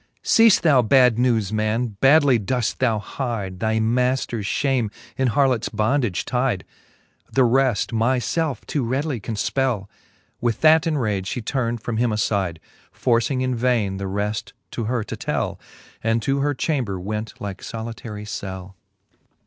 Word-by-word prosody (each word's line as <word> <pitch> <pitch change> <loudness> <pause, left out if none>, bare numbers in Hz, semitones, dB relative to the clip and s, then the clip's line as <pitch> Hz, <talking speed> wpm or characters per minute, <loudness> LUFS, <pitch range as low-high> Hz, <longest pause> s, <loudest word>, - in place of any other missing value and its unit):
Ceafej 225 -3 +5
thou 145 -6 +5
bad 125 0 +4
newes 115 -5 +1
men, 110 +3 0
badly 140 -3 +5
doeft 120 +3 -1
thou 115 -4 +2
hide 105 -5 -4
Thy 110 +1 0
maifters 120 -1 0
fhame, 130 -5 0 0.2
in 130 - +1
harlots 125 -1 +2
bondage 110 -3 0
tide. 125 -7 -1 0.7
The 135 - +3
reft 125 -1 +2
myfelf 130 +6 0
too 145 - -1
readily 130 +2 -1
can 110 +2 -5
fpell. 120 -3 -1 0.5
With 120 -2 -1
that 160 0 +5
in 155 -2 +1
rage 105 -7 -1
ftie 120 - -4
turn'd 120 -4 -1
from 115 -2 -2
him 120 +1 +2
afide. 100 -5 0 0.3
Forcing 120 +2 +1
in 130 0 0
vaine 115 -5 +1
the 100 0 -4
reft 105 +2 -3 0.2
to 115 - -3
her 120 0 -1
to - - -6
tell, - - -2 0.4
And 115 +1 +2
to 135 +3 +1
her 145 +1 0
chamber 125 - -1
went 105 +3 -5
like 100 -1 -6
folitary 115 -2 -7
cell. 95 -2 -6
115 Hz, 150 wpm, -22 LUFS, 105-130 Hz, 0.7 s, Ceafej